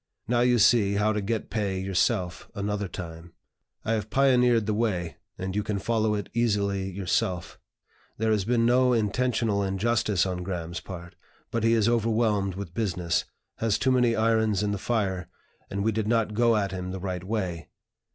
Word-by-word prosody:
Now 120 +1 +2
you 125 0 +4
see 105 -2 +4
how 105 +2 +2
to 105 - -1
get 110 +2 -3
pay 100 -4 -1
yourself, 95 -1 -1
another 100 0 -2
time; 85 -2 -8 0.5
I 110 - 0
have 110 -1 -2
pioneered 125 -3 +4
the 105 - 0
way, 100 -7 -1 0.2
and 95 +1 -4
you 105 - +1
can 105 -1 -2
follow 110 +1 +1
it 105 - -4
easily 100 -4 0
yourself. 90 -1 -2 0.6
There 110 0 +1
has 105 -2 +2
been 115 +2 +2
no 125 +1 +4
intentional 115 -1 +1
injustice 100 -1 +1
on 90 -1 -3
Graham's 85 -2 -4
part; 85 0 -9 0.4
but 115 -1 -1
he 115 0 +4
is 110 -2 +3
overwhelmed 110 -4 +1
with 95 -3 -7
business, 90 -5 -1 0.3
has 110 -3 +1
too 130 - +1
many 125 -2 +3
irons 110 -2 +2
in 105 - 0
the 100 - -2
fire, 95 -6 -1 0.4
and 100 0 -2
we 110 - +2
did 110 0 -2
not 115 -2 +1
go 115 +1 +3
at 100 -3 0
him 90 -1 -4
the 95 +1 -5
right 90 -1 -4
way. 95 -7 -3
105 Hz, 180 wpm, -27 LUFS, 95-115 Hz, 0.6 s, you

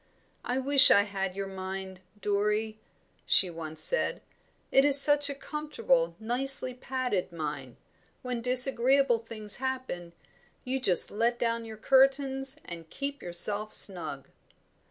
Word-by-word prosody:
"I 250 - -4
wish 275 +1 +6
I 200 - +4
had 195 -2 -5
your 195 0 -5
mind, 190 -1 -8 0.2
Dorrie," 210 +2 -2 0.4
she 185 - +1
said 170 - -13
once. 160 - -1
"It - - -2 0.6
is 285 -1 +5
such 290 0 +6
a 280 - -6
comfortable, 460 - -3
nicely 255 +3 +3
padded 250 -7 -4
mind. 150 -6 -7 0.5
When 250 -2 -5
disagreeable 255 0 +4
things 215 -2 -5
happen, 255 -10 -6 0.5
you 260 +1 -4
just 185 -9 +3
let 230 +3 -1
down 230 -1 -3
your 220 -1 -11
curtains 270 +2 +1
and 165 -2 -10
keep 280 - -7
yourself 205 +5 -4
snug." 170 -8 -2
230 Hz, 130 wpm, -27 LUFS, 195-270 Hz, 0.6 s, wish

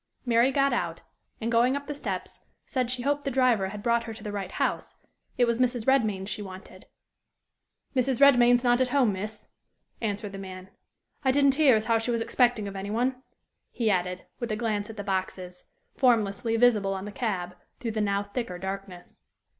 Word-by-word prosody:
Mary 235 +1 +4
got 275 0 +2
out, - - -2 0.4
and, 230 +1 -2
going 240 +3 +3
up 285 0 -4
the 295 - -4
steps, 290 - -5 0.2
said 255 -3 -1
she 250 -1 -2
hoped 285 +1 0
the 275 - -1
driver 250 -7 +2
had 205 +1 -8
brought 235 -1 +2
her 225 -1 -6
to 215 - -11
the 210 - -4
right 195 -2 -5
house: - - -2 0.4
it 245 - +4
was 235 0 0
Mrs. 245 -3 +1
Redmain's 215 -8 +2
she 210 - -3
wanted. 185 -1 -11 1.1
"Mrs. 255 -1 +1
Redmain 245 -3 +7
is 245 - 0
not 245 0 +3
at 255 - +3
home, 250 -5 +2
miss," 210 +2 -6 0.5
answered 205 -2 -3
the 195 - -7
man. 185 -1 -9 0.5
"I 265 - +2
didn't 280 0 +4
hear 280 -4 +5
as 215 0 0
how 230 -1 +2
she 225 - -3
was 235 -1 +1
expecting 240 -3 +2
of 200 - -7
any 195 +1 -5
one," 250 +4 -1 0.5
he 225 -3 0
added, 180 -1 -1
with 240 -2 -3
a - - 0
glance 210 -2 -2
at 225 - -9
the 205 - -4
boxes, 185 -2 -4 0.3
formlessly 230 -2 +2
visible 215 -5 +3
on 190 +1 -5
the 210 - -6
cab, 190 -6 -3 0.2
through 230 - -3
the 215 0 -2
now 200 -1 +1
thicker 205 -3 -5
darkness. 190 -1 -7
225 Hz, 200 wpm, -27 LUFS, 200-250 Hz, 1.1 s, Redmain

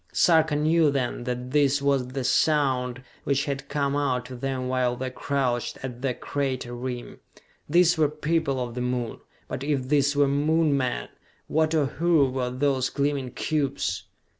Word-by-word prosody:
Sarka 160 -3 +4
knew 155 +1 +3
then 130 -3 -2
that 125 0 -4
this 145 -1 +3
was 140 -2 +1
the 130 +1 -4
sound 130 -2 +1 0.2
which 140 0 +1
had 140 -1 -4
come 140 -1 0
out 130 -4 0
to 130 +1 -8
them 130 0 -3
while 125 -1 +1
they 130 +1 -4
crouched 130 -3 -1
at 125 -2 -6
the 130 -2 -1
crater 130 -3 -3
rim. 125 0 -6 0.5
These 170 0 +4
were 150 -2 +4
people 150 -2 -1
of 120 -2 -3
the 125 - -4
Moon: 125 -2 -2 0.3
but 130 - -5
if 140 -3 -1
these 140 -1 +3
were 145 0 +4
Moon 150 +2 +2
men, 125 - -1 0.4
what, 160 +1 +1
or 150 -3 +3
who, 150 -1 +2
were 130 -1 -1
those 130 0 0
gleaming 140 -2 -1
cubes? 140 - -2
135 Hz, 165 wpm, -26 LUFS, 125-145 Hz, 0.5 s, Sarka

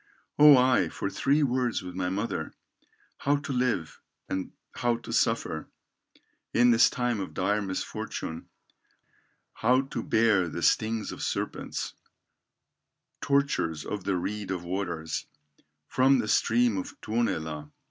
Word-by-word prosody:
Oh! 130 -4 +7
for 100 - -4
three 145 +2 +2
words 125 -5 0
with 90 0 -7
my 90 0 -2
mother, 95 -4 -3 0.7
How 145 +1 +2
to 140 -1 -4
live, 125 -10 -1 0.3
and 95 -1 -3 0.2
how 120 -1 0
to 115 - -8
suffer, 115 -10 0 0.9
In 120 +1 +6
this 115 0 +6
time 120 -3 -1
of 95 - -6
dire 105 +3 +1
misfortune, 95 -4 -5 1.0
How 125 +3 +3
to 135 -3 -5
bear 110 -6 +2
the - - -5
stings 110 0 +1
of - - -8
serpents, - - -3 1.3
Tortures 140 - 0
of 105 -2 -4
the 95 -1 0
reed 105 +2 -4
of 90 -2 -3
waters, 85 -3 -3 0.6
From 135 +1 +4
the 115 -3 -1
stream 115 -1 +2
of - - -8
Tuonela! 80 -10 -2
110 Hz, 125 wpm, -28 LUFS, 95-125 Hz, 1.3 s, Oh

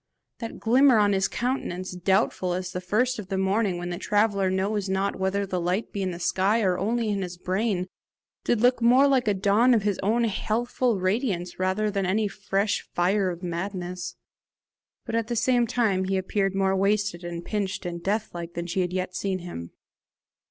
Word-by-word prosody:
That 230 -2 -6
glimmer 255 +2 +5
on 205 -1 +4
his 195 0 +2
countenance, 210 -8 -3
doubtful 180 0 +1
as 180 0 -3
the 180 - -4
first 235 +7 0
of 200 - -7
the 195 0 -2
morning, 190 0 +1
when 175 0 -4
the 175 - -4
traveller 205 -2 +2
knows 195 +1 -1
not 195 +1 0
whether 195 +1 0
the 185 -2 -2
light 180 +6 -1
be 200 - -2
in 190 - 0
the 175 - -5
sky 195 +5 +1
or 185 -2 +1
only 225 +3 0
in 200 -1 -1
his 180 -1 -5
brain, 185 +1 -1 0.6
did 235 -3 +1
look 245 0 +3
more 250 +4 +6
like 265 -4 +2
a 205 - +3
dawn 210 +6 +4
of 215 - +1
his 205 -2 0
old 230 +4 +2
healthful 230 +1 0
radiance 185 -2 -1
than 195 +1 0
any 210 +3 +1
fresh 200 +1 -1
fire 190 +2 +2
of 175 0 -6
madness; 180 0 -4 0.9
but - - -5
at 230 -1 0
the 240 - -2
same 245 0 +2
time 210 -6 +1
he 190 0 0
appeared 195 +1 -1
more 195 0 +2
wasted 200 -2 0
and 170 0 -6
pinched 200 -2 -3
and 170 -1 -4
death 210 +4 -1
like 170 0 -7
than 170 - -3
she 180 +2 -1
had 180 -1 -1
yet 185 0 -3
seen 190 -1 -1
him. 170 - -7
195 Hz, 195 wpm, -26 LUFS, 185-215 Hz, 0.9 s, more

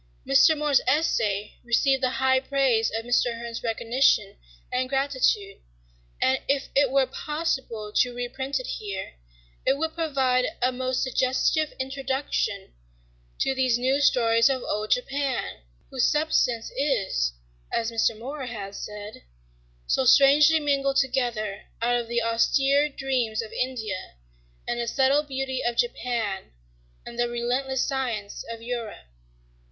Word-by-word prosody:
Mr. 305 - +5
More's 295 -2 +3
essay 215 -8 0
received 265 +3 +2
the 255 - +2
high 260 0 +3
praise 265 -4 +1
of 225 - -5
Mr. 245 -1 +1
Hearn's 235 0 -6
recognition 235 +3 +1 0.4
and 255 0 0
gratitude, 260 -7 0 0.6
and 260 0 +2
if 275 0 0
it 280 -1 +4
were 270 0 +3
possible 265 -6 -3
to 250 - +3
reprint 245 +3 -3
it - - -6
here, 195 - -5 0.5
it 270 - +2
would 320 +2 -2
provide 265 -6 +1
a 250 +1 +2
most 255 0 -1
suggestive 260 +4 +1
introduction 265 -6 -2 0.7
to 270 - +2
these 260 -3 +2
new 260 +3 +1
stories 230 -2 +4
of 260 -2 -1
old 210 +1 -3
Japan, 270 +1 -1 0.3
whose 260 -3 +2
substance 275 -6 +1
is, 205 - 0 0.4
as 230 0 -1
Mr. 225 -1 +1
More 265 +3 -6
has 200 -3 -6
said, 210 0 -8 0.6
"so - - +1
strangely 295 +3 +6
mingled 275 -2 +1
together 240 -6 -1
out 240 +1 +1
of 240 -1 -1
the 235 0 0
austere 275 +5 +2
dreams 255 -6 -1
of 220 - -10
India 220 - -4 0.5
and 240 - -2
the 235 - -2
subtle 270 +4 +3
beauty 270 -2 -3
of 240 0 -1
Japan 230 - -2 0.5
and 240 0 -9
the 240 0 +1
relentless 250 +2 -1
science 240 -7 -3
of 230 0 -7
Europe." 235 - -5
255 Hz, 135 wpm, -25 LUFS, 230-275 Hz, 0.7 s, strangely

